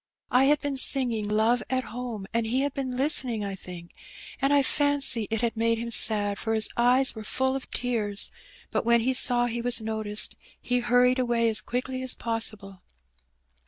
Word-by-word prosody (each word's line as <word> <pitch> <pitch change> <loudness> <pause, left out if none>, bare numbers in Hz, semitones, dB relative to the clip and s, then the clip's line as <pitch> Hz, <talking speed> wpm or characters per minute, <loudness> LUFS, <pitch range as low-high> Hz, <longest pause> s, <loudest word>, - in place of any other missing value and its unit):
I 255 +2 +4
had 295 +1 +3
been 285 -1 -3
singing 245 -6 +2
'Love 220 +3 +1
at 260 0 0
Home,' 240 -5 -7
and 230 -1 0
he 255 +4 0
had 285 -1 -2
been 260 -3 -4
listening, 255 -6 0
I 200 - -4
think; 180 -2 -10 0.5
and 275 +1 +1
I 285 -1 +4
fancy 280 -6 +2
it 225 -1 -2
had 235 -1 -1
made 230 0 0
him 235 +1 -5
sad, 205 -3 +4
for 225 0 -2
his 220 -1 0
eyes 250 +2 +3
were 220 - -9
full 260 +4 -1
of 270 - -7
tears, 220 -5 -2 0.4
but - - -1
when 235 0 +3
he 260 +3 0
saw 245 -1 +3
he 235 0 -3
was 245 0 +1
noticed 220 -1 -2 0.2
he 245 0 -1
hurried 245 +1 +2
away 235 -2 +1
as 220 - 0
quickly 255 +1 -4
as 260 -1 0
possible." 215 -5 -2
235 Hz, 190 wpm, -26 LUFS, 220-260 Hz, 0.5 s, I